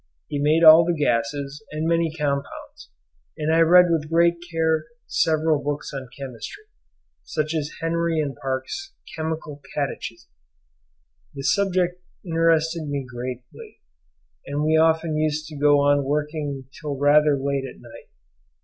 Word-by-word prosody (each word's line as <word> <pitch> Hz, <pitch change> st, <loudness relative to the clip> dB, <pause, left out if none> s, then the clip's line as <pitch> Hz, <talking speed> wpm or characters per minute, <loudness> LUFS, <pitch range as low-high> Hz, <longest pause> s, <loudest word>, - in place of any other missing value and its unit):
He 145 Hz, -, -2 dB
made 155 Hz, +3 st, +3 dB
all 160 Hz, +1 st, +10 dB
the 170 Hz, 0 st, -1 dB
gases 140 Hz, +3 st, -1 dB
and 155 Hz, +1 st, -2 dB
many 165 Hz, -1 st, +1 dB
compounds, 140 Hz, -2 st, -4 dB, 0.5 s
and 155 Hz, +1 st, 0 dB
I 165 Hz, -, +4 dB
read 180 Hz, +2 st, +7 dB
with 155 Hz, -2 st, 0 dB
great 170 Hz, +1 st, +3 dB
care 160 Hz, -1 st, +1 dB, 0.2 s
several 155 Hz, -2 st, +1 dB
books 145 Hz, 0 st, -3 dB
on 135 Hz, -2 st, -6 dB
chemistry, 135 Hz, -, -8 dB, 0.6 s
such 155 Hz, +1 st, -3 dB
as 150 Hz, -2 st, -3 dB
Henry 165 Hz, 0 st, 0 dB
and 145 Hz, -3 st, -2 dB
Parkes' 135 Hz, -, -4 dB, 0.2 s
'Chemical 155 Hz, -2 st, -5 dB
Catechism.' 115 Hz, -, -4 dB, 1.0 s
The 135 Hz, -, -6 dB
subject 180 Hz, 0 st, +1 dB, 0.2 s
interested 165 Hz, -1 st, +1 dB
me 140 Hz, -2 st, -3 dB
greatly, 125 Hz, 0 st, -8 dB, 0.7 s
and 145 Hz, +1 st, -2 dB
we 155 Hz, +1 st, +2 dB
often 160 Hz, 0 st, +2 dB
used 155 Hz, 0 st, -1 dB
to 155 Hz, -, -9 dB
go 145 Hz, 0 st, +4 dB
on 145 Hz, 0 st, +3 dB
working 145 Hz, -1 st, -2 dB, 0.2 s
till 145 Hz, -2 st, -4 dB
rather 145 Hz, +1 st, +4 dB
late 140 Hz, 0 st, -2 dB
at -, -, -17 dB
night. -, -, -14 dB
150 Hz, 140 wpm, -23 LUFS, 140-165 Hz, 1.0 s, all